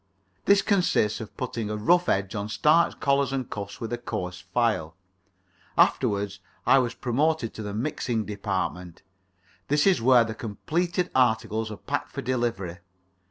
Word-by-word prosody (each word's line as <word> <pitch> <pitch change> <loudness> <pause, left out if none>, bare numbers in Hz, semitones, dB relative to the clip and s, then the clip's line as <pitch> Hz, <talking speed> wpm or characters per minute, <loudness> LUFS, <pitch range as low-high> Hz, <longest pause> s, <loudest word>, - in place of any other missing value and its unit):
This 200 0 +5
consists 180 - +2
in 110 - -5
putting 115 -3 -4
a 105 - -2
rough 175 +12 +3
edge 95 0 0
on 105 0 -3
starched 155 +9 +3
collars 140 -1 +2
and 135 -2 -2
cuffs 100 -1 -6
with 115 +1 -4
a 120 - -2
coarse 90 -6 -5
file. 105 -10 0 0.8
Afterwards 100 -1 +2 0.3
I 135 - +6
was 120 -2 -1
promoted 135 0 0
to - - -7
the 105 -1 -5
mixing 115 -3 -2
department. 95 -4 -4 0.6
This 145 +1 +2
is 190 -11 +4
where 125 0 +6
the 110 -1 -4
completed 170 - -2
articles 110 -3 +1
are 105 - -7
packed - - -3
for - - -4
delivery. 115 -8 -2
115 Hz, 155 wpm, -26 LUFS, 105-135 Hz, 0.8 s, I